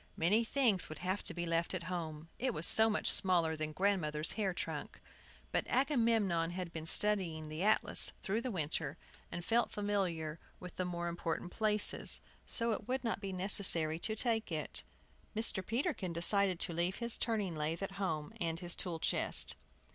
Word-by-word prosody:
Many 200 Hz, +8 st, +2 dB
things 230 Hz, -6 st, +1 dB
would 155 Hz, -, -8 dB
have 185 Hz, +4 st, -3 dB
to -, -, +1 dB
be 175 Hz, 0 st, -4 dB
left 165 Hz, +2 st, -2 dB
at 175 Hz, -, -5 dB
home, 165 Hz, -3 st, -6 dB
it 255 Hz, -1 st, -2 dB
was 155 Hz, -, +2 dB
so 220 Hz, +5 st, +6 dB
much 215 Hz, -, +1 dB
smaller 170 Hz, -4 st, +2 dB
than 155 Hz, 0 st, -4 dB
the -, -, -11 dB
grandmother's 165 Hz, -6 st, 0 dB
hair 205 Hz, -4 st, -2 dB
trunk. 175 Hz, -, -6 dB, 0.5 s
But -, -, -2 dB
Agamemnon 225 Hz, -, +1 dB
had 175 Hz, -1 st, -6 dB
been 160 Hz, 0 st, -5 dB
studying 170 Hz, -7 st, +2 dB
the 155 Hz, +2 st, -6 dB
atlas 215 Hz, +3 st, +2 dB
through 215 Hz, +4 st, -1 dB
the 255 Hz, -, -4 dB
winter, 160 Hz, -, -3 dB, 0.3 s
and 175 Hz, -, -6 dB
felt 235 Hz, +1 st, +1 dB
familiar 180 Hz, -7 st, -3 dB, 0.2 s
with 180 Hz, -1 st, -10 dB
the 185 Hz, -, -2 dB
more 175 Hz, -1 st, -4 dB
important 170 Hz, +1 st, -4 dB
places, 215 Hz, -1 st, +5 dB, 0.3 s
so 230 Hz, -1 st, -1 dB
it 215 Hz, 0 st, -5 dB
would 260 Hz, 0 st, -2 dB
not 225 Hz, -3 st, -3 dB
be 195 Hz, -1 st, -5 dB
necessary 180 Hz, -4 st, +4 dB
to 215 Hz, +4 st, -1 dB
take 225 Hz, -3 st, 0 dB
it. 155 Hz, -2 st, -4 dB, 0.5 s
And 220 Hz, -, -1 dB
Mr. 190 Hz, -4 st, +2 dB
Peterkin 230 Hz, -, -3 dB
decided 185 Hz, +1 st, +3 dB
to 170 Hz, -, +1 dB
leave 175 Hz, +3 st, -1 dB
his 235 Hz, -1 st, -1 dB
turning 210 Hz, -7 st, -2 dB
lathe 155 Hz, +4 st, -3 dB
at 195 Hz, -, -5 dB
home, 155 Hz, -5 st, -3 dB
and 165 Hz, -1 st, -2 dB
his 175 Hz, -1 st, -1 dB
tool 175 Hz, -3 st, -4 dB
chest. -, -, +3 dB
185 Hz, 185 wpm, -33 LUFS, 165-215 Hz, 0.5 s, so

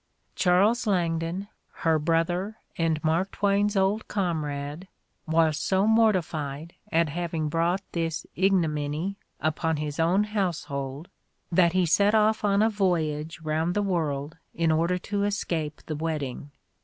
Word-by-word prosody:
Charles 205 Hz, +6 st, +3 dB
Langdon, 170 Hz, 0 st, 0 dB, 0.4 s
her 160 Hz, -1 st, +4 dB
brother 175 Hz, +6 st, 0 dB, 0.2 s
and 160 Hz, -2 st, 0 dB
Mark 165 Hz, +5 st, +1 dB
Twain's 205 Hz, +1 st, +1 dB
old 195 Hz, +3 st, +1 dB
comrade, 155 Hz, -3 st, -3 dB, 0.4 s
was 160 Hz, -1 st, +3 dB
so 190 Hz, +1 st, +2 dB
mortified 170 Hz, -9 st, +1 dB, 0.2 s
at 165 Hz, -1 st, +2 dB
having 165 Hz, -1 st, -2 dB
brought 170 Hz, +4 st, 0 dB
this 165 Hz, -2 st, -2 dB
ignominy 170 Hz, -1 st, 0 dB, 0.2 s
upon 155 Hz, +1 st, 0 dB
his 150 Hz, +1 st, -4 dB
own 175 Hz, +5 st, +3 dB
household, 160 Hz, -8 st, -3 dB, 0.4 s
that 170 Hz, -1 st, +4 dB
he 185 Hz, -1 st, +3 dB
set 200 Hz, +6 st, +3 dB
off 215 Hz, 0 st, +3 dB
on 200 Hz, 0 st, +3 dB
a 220 Hz, -, +4 dB
voyage 165 Hz, -5 st, -1 dB
round 160 Hz, +2 st, -1 dB
the 205 Hz, -, +1 dB
world 155 Hz, -5 st, -2 dB, 0.2 s
in 165 Hz, -1 st, +2 dB
order 170 Hz, +3 st, +2 dB
to 200 Hz, +2 st, -2 dB
escape 170 Hz, -7 st, -2 dB
the 155 Hz, -, -4 dB
wedding. 150 Hz, -3 st, -3 dB
170 Hz, 130 wpm, -26 LUFS, 155-195 Hz, 0.4 s, her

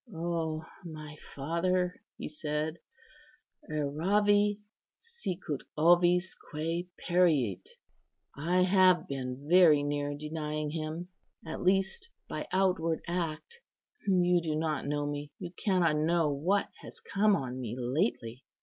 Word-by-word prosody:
"O 160 Hz, -1 st, -2 dB, 0.2 s
my 155 Hz, -3 st, -8 dB, 0.2 s
father," 180 Hz, +5 st, 0 dB, 0.2 s
he -, -, -5 dB
said, 150 Hz, +1 st, -3 dB, 0.4 s
" 300 Hz, 0 st, -27 dB
'Erravi, 205 Hz, +8 st, +2 dB, 0.4 s
sicut 190 Hz, -, -5 dB, 0.2 s
ovis 175 Hz, +3 st, +4 dB, 0.2 s
quæ 165 Hz, +3 st, -2 dB
periit.' 160 Hz, -, +2 dB, 0.7 s
I 175 Hz, +5 st, +2 dB
have 185 Hz, -1 st, +4 dB
been 135 Hz, 0 st, -5 dB
very 165 Hz, -4 st, +6 dB
near 145 Hz, 0 st, -1 dB
denying 150 Hz, 0 st, -3 dB
Him, 160 Hz, +2 st, -4 dB, 0.4 s
at 160 Hz, -, -5 dB
least 190 Hz, -, +1 dB, 0.2 s
by -, -, -5 dB
outward 180 Hz, -4 st, +1 dB
act. 175 Hz, -, -3 dB, 0.5 s
You 180 Hz, -2 st, +4 dB
do 160 Hz, -2 st, -2 dB
not 155 Hz, -2 st, -1 dB
know 145 Hz, 0 st, -1 dB
me; 145 Hz, 0 st, -5 dB
you 175 Hz, -2 st, -7 dB
cannot 180 Hz, -5 st, +1 dB
know 160 Hz, 0 st, +2 dB
what 175 Hz, +9 st, +1 dB
has -, -, -8 dB
come 205 Hz, +1 st, +2 dB
on 130 Hz, -5 st, -4 dB
me 120 Hz, -2 st, -4 dB
lately. 125 Hz, -, -1 dB
165 Hz, 120 wpm, -30 LUFS, 150-180 Hz, 0.7 s, very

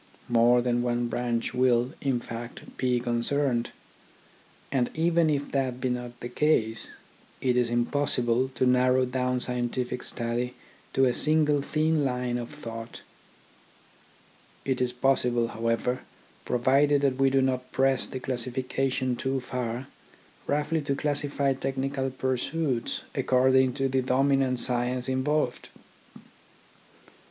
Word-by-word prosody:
More 120 Hz, +1 st, +4 dB
than 120 Hz, -1 st, +1 dB
one 120 Hz, 0 st, 0 dB
branch 120 Hz, -1 st, -1 dB
will, 125 Hz, +1 st, +2 dB
in 135 Hz, -3 st, +1 dB
fact, 115 Hz, 0 st, -8 dB
be 125 Hz, -1 st, +1 dB
concerned; 120 Hz, +1 st, 0 dB, 1.0 s
and 125 Hz, -3 st, +1 dB
even 165 Hz, 0 st, +3 dB
if 145 Hz, -1 st, -1 dB
that 130 Hz, -2 st, -1 dB
be 130 Hz, -, -1 dB
not 125 Hz, -1 st, -4 dB
the -, -, -4 dB
case, 120 Hz, -4 st, +1 dB, 0.5 s
it 125 Hz, -2 st, +1 dB
is 125 Hz, -1 st, +2 dB
impossible 120 Hz, 0 st, +1 dB
to -, -, +2 dB
narrow 125 Hz, +1 st, +4 dB
down 125 Hz, 0 st, -1 dB
scientific 125 Hz, 0 st, -2 dB
study 120 Hz, +1 st, -3 dB, 0.4 s
to 135 Hz, -, +4 dB
a 125 Hz, -, +2 dB
single 150 Hz, -1 st, +3 dB
thin 155 Hz, +1 st, +1 dB
line 125 Hz, -2 st, -1 dB
of 120 Hz, -, -6 dB
thought. 115 Hz, -6 st, -8 dB, 1.6 s
It 130 Hz, -1 st, 0 dB
is 125 Hz, -1 st, +1 dB
possible, 125 Hz, -2 st, +1 dB
however, 115 Hz, +2 st, -1 dB, 0.5 s
provided 140 Hz, +4 st, +3 dB
that 135 Hz, -2 st, +1 dB
we 135 Hz, 0 st, +4 dB
do 135 Hz, 0 st, +3 dB
not 130 Hz, -1 st, -1 dB
press 135 Hz, -1 st, +2 dB
the 130 Hz, -, -5 dB
classification 130 Hz, +1 st, -1 dB
too 130 Hz, +2 st, -1 dB
far, 125 Hz, 0 st, -4 dB, 0.6 s
roughly 150 Hz, +2 st, 0 dB
to 140 Hz, -1 st, -1 dB
classify 145 Hz, -1 st, 0 dB
technical 135 Hz, 0 st, -2 dB
pursuits 130 Hz, +1 st, -1 dB
according 130 Hz, 0 st, +3 dB
to 135 Hz, 0 st, 0 dB
the 130 Hz, 0 st, +1 dB
dominant 135 Hz, 0 st, +2 dB
science 125 Hz, +1 st, 0 dB
in 130 Hz, 0 st, 0 dB
volved. 150 Hz, -4 st, -1 dB
130 Hz, 125 wpm, -27 LUFS, 120-135 Hz, 1.6 s, More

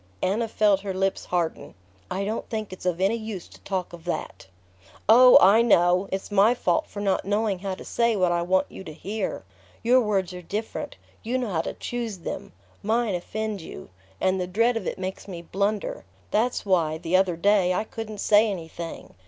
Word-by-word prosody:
Anna 220 Hz, +5 st, +1 dB
felt 210 Hz, -3 st, +3 dB
her 195 Hz, -1 st, -5 dB
lips 195 Hz, 0 st, -1 dB
harden. 175 Hz, -2 st, -2 dB, 0.3 s
"I 195 Hz, +1 st, -2 dB
don't 220 Hz, +3 st, -3 dB
think 215 Hz, -4 st, -4 dB
it's 185 Hz, -, -6 dB
of 175 Hz, -1 st, 0 dB
any 195 Hz, +5 st, +2 dB
use 215 Hz, -5 st, -6 dB
to -, -, -16 dB
talk 185 Hz, -3 st, -3 dB
of 170 Hz, -1 st, -10 dB
that." 175 Hz, -, -4 dB, 0.6 s
"Oh, 250 Hz, +3 st, +9 dB
I 200 Hz, +5 st, +6 dB
know! 180 Hz, -4 st, +3 dB
It's 190 Hz, +2 st, -4 dB
my 205 Hz, +4 st, +5 dB
fault 175 Hz, -7 st, 0 dB
for 205 Hz, -, -7 dB
not 195 Hz, -2 st, +1 dB
knowing 205 Hz, -1 st, 0 dB
how 195 Hz, 0 st, -3 dB
to -, -, -11 dB
say 235 Hz, -1 st, +1 dB
what 185 Hz, -3 st, +2 dB
I 175 Hz, 0 st, +1 dB
want 185 Hz, +2 st, +2 dB
you -, -, -9 dB
to 155 Hz, -, -8 dB
hear. 205 Hz, +7 st, -4 dB, 0.4 s
Your 250 Hz, +2 st, +5 dB
words 195 Hz, -5 st, 0 dB
are 180 Hz, -, -7 dB
different; 210 Hz, +6 st, -5 dB, 0.3 s
you 240 Hz, +3 st, -1 dB
know 250 Hz, -3 st, -2 dB
how 160 Hz, -3 st, +1 dB
to -, -, -5 dB
choose 235 Hz, -4 st, -4 dB
them. 170 Hz, -, -6 dB, 0.3 s
Mine 225 Hz, 0 st, +1 dB
offend 210 Hz, +3 st, -3 dB
you... 95 Hz, -, -10 dB, 0.3 s
and 185 Hz, 0 st, +1 dB
the 180 Hz, -, -2 dB
dread 230 Hz, +6 st, +2 dB
of 225 Hz, -, -3 dB
it -, -, -3 dB
makes 190 Hz, +1 st, -5 dB
me 175 Hz, -3 st, -7 dB
blunder. 200 Hz, +4 st, -2 dB, 0.3 s
That's 235 Hz, +1 st, 0 dB
why, 165 Hz, -5 st, +2 dB
the 165 Hz, +3 st, -1 dB
other 185 Hz, -2 st, +3 dB
day, 195 Hz, 0 st, +3 dB
I 185 Hz, -, 0 dB
couldn't 220 Hz, -1 st, -7 dB
say 215 Hz, +1 st, +5 dB
anything 170 Hz, -3 st, -7 dB
195 Hz, 200 wpm, -25 LUFS, 180-220 Hz, 0.6 s, Oh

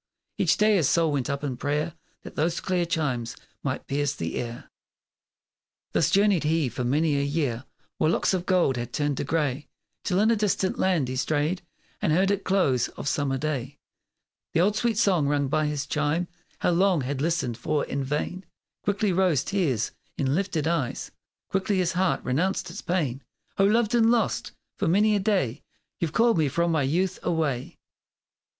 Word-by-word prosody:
Each 180 Hz, -2 st, +3 dB
day 210 Hz, -1 st, +4 dB
his 160 Hz, -7 st, +2 dB
soul 165 Hz, -2 st, +3 dB
went 140 Hz, -2 st, -1 dB
up 140 Hz, +1 st, -2 dB
in 130 Hz, -4 st, -3 dB
prayer 150 Hz, +4 st, -1 dB, 0.3 s
That -, -, -9 dB
those 165 Hz, +2 st, 0 dB
clear 180 Hz, -2 st, 0 dB
chimes 135 Hz, -8 st, -1 dB, 0.3 s
might -, -, -3 dB
pierce 145 Hz, 0 st, -1 dB
the 80 Hz, 0 st, -4 dB
air! 120 Hz, -1 st, -6 dB, 1.2 s
Thus -, -, +2 dB
journeyed 200 Hz, -3 st, +3 dB
he 155 Hz, -3 st, +1 dB
for 125 Hz, -, -4 dB
many 145 Hz, +4 st, +2 dB
a -, -, +1 dB
year 140 Hz, -4 st, -1 dB, 0.3 s
While 155 Hz, -, +3 dB
locks 170 Hz, -, +1 dB
of 185 Hz, -1 st, -2 dB
gold 175 Hz, -9 st, +3 dB
had 120 Hz, -1 st, -5 dB
turned 145 Hz, -2 st, 0 dB
to -, -, -1 dB
grey 145 Hz, -2 st, -1 dB, 0.4 s
Till 185 Hz, -1 st, +1 dB
in 220 Hz, +2 st, +4 dB
a -, -, +4 dB
distant 205 Hz, -3 st, 0 dB
land 175 Hz, -8 st, +2 dB
he 130 Hz, -, -3 dB
strayed 150 Hz, +7 st, 0 dB, 0.4 s
And -, -, +1 dB
heard 190 Hz, +5 st, +3 dB
at 200 Hz, -1 st, -1 dB
close 135 Hz, -11 st, +2 dB
of -, -, -8 dB
summer 135 Hz, -1 st, 0 dB
day 140 Hz, -2 st, -3 dB, 0.8 s
The 165 Hz, -, +3 dB
old 205 Hz, +3 st, +3 dB
sweet 230 Hz, -1 st, 0 dB
song 180 Hz, -9 st, +3 dB
rung 145 Hz, -1 st, +1 dB
by 155 Hz, +1 st, +1 dB
his 150 Hz, -2 st, -2 dB
chime 150 Hz, +4 st, 0 dB, 0.4 s
He -, -, +4 dB
long 180 Hz, -1 st, +3 dB
had 135 Hz, +1 st, -3 dB
listened 160 Hz, -7 st, 0 dB
for 150 Hz, +3 st, 0 dB
in 140 Hz, -, -3 dB
vain! 150 Hz, +7 st, -3 dB, 0.4 s
Quickly 205 Hz, -1 st, 0 dB
rose 175 Hz, -7 st, +2 dB
tears 150 Hz, -, 0 dB, 0.3 s
in 135 Hz, -2 st, +1 dB
lifted 180 Hz, -3 st, -1 dB
eyes, 165 Hz, -7 st, -1 dB, 0.4 s
Quickly 195 Hz, +1 st, 0 dB
his 180 Hz, -2 st, +1 dB
heart 185 Hz, 0 st, 0 dB
renounced 170 Hz, +7 st, 0 dB
its 195 Hz, -, -7 dB
pain! 145 Hz, -8 st, -1 dB, 0.4 s
"O 195 Hz, -, +6 dB
loved 220 Hz, +2 st, +2 dB
and 230 Hz, -1 st, +5 dB
lost! 235 Hz, -1 st, +1 dB, 0.3 s
for -, -, +1 dB
many 210 Hz, +5 st, +4 dB
a -, -, +2 dB
day 190 Hz, -, 0 dB, 0.4 s
You've 165 Hz, -3 st, -1 dB
called 230 Hz, +1 st, +3 dB
me 155 Hz, -, +3 dB
from 170 Hz, +5 st, +1 dB
my 160 Hz, -2 st, +2 dB
youth 175 Hz, +7 st, 0 dB
away!" 155 Hz, -7 st, -1 dB
160 Hz, 185 wpm, -26 LUFS, 140-190 Hz, 1.2 s, O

